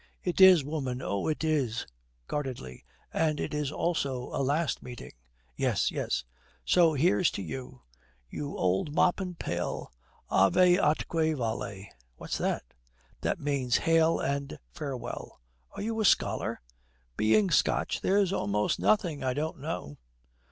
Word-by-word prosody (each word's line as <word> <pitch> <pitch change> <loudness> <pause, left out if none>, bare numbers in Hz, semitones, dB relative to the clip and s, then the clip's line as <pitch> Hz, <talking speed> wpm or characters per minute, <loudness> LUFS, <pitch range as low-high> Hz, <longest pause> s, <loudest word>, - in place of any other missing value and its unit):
'It 180 +1 0
is, 185 -5 +9
woman, 135 -4 -3
oh, 100 -6 -2
it 155 0 -1
is,' 135 -7 0 0.4
guardedly, 125 - -5 0.3
'and 155 -2 +1
it's 150 -2 -2
also 140 -7 -1
a - - -1
last 145 +4 0
meeting.' 120 -2 -9 0.4
'Yes, - - +1
yes.' - - -2 0.4
'So 165 -3 +4
here's 175 +4 +3
to 100 - -5
you 125 +8 -7 0.4
you 145 - -5
old 95 +11 0
mop 180 - +3
and 180 -3 -5
pail. - - -3 0.4
Ave 180 - +5
atque 160 0 +1
vale.' 110 -5 -3 0.3
'What's - - -4
that?' - - -1 0.6
'That - - -1
means 140 -4 +1
Hail 165 0 +3
and 140 0 -2
Farewell.' 135 - -6 0.4
'Are - - -4
you 225 +1 -1
a - - +1
scholar?' - - +2 0.5
'Being 110 - +3
Scotch, - - +1
there's 195 -1 +2
almost 105 - 0
nothing 175 -10 +1
I 130 -1 0
don't 155 +1 -3
know.' 135 - -5
145 Hz, 135 wpm, -29 LUFS, 125-165 Hz, 0.6 s, is